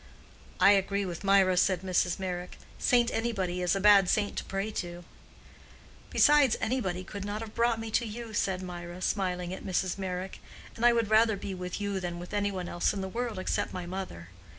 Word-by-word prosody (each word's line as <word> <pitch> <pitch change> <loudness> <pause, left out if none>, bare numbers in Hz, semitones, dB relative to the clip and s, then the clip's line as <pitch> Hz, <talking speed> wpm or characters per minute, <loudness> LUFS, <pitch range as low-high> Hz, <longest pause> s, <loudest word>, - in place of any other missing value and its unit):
"I 200 - +7
agree 200 0 +1
with 175 -1 -6
Mirah," 195 -2 +4
said 185 -1 +2
Mrs. 180 -1 +1
Meyrick. 180 -1 -5 0.2
"Saint 240 -1 +3
Anybody 195 -6 -1
is 180 +1 +2
a - - 0
bad 200 -2 +6
saint 205 -1 +1
to - - -2
pray 195 +2 -3
to." 175 -3 -5 1.1
"Besides, 290 -5 +5
Anybody 190 -7 -1
could 200 +1 -7
not 205 +2 -4
have 220 -1 -8
brought 235 -1 +1
me 225 0 -5
to 235 +1 +1
you," 225 +1 -7
said 190 -3 -1
Mirah, 175 0 -7
smiling 180 -2 -1
at - - -7
Mrs. 185 0 -1
Meyrick. 185 0 -4 0.4
"And 225 - -6
I - - +7
would 230 -2 0
rather 220 -1 +4
be 195 0 -5
with 180 0 -5
you 200 -1 -2
than 175 -2 -4
with 175 +3 -9
any 205 0 +1
one 185 -2 -4
else 175 - 0
in 200 - -4
the 190 - -3
world 235 0 -3
except 185 - -2
my 180 -1 -5
mother. 175 - -6
195 Hz, 200 wpm, -29 LUFS, 180-215 Hz, 1.1 s, I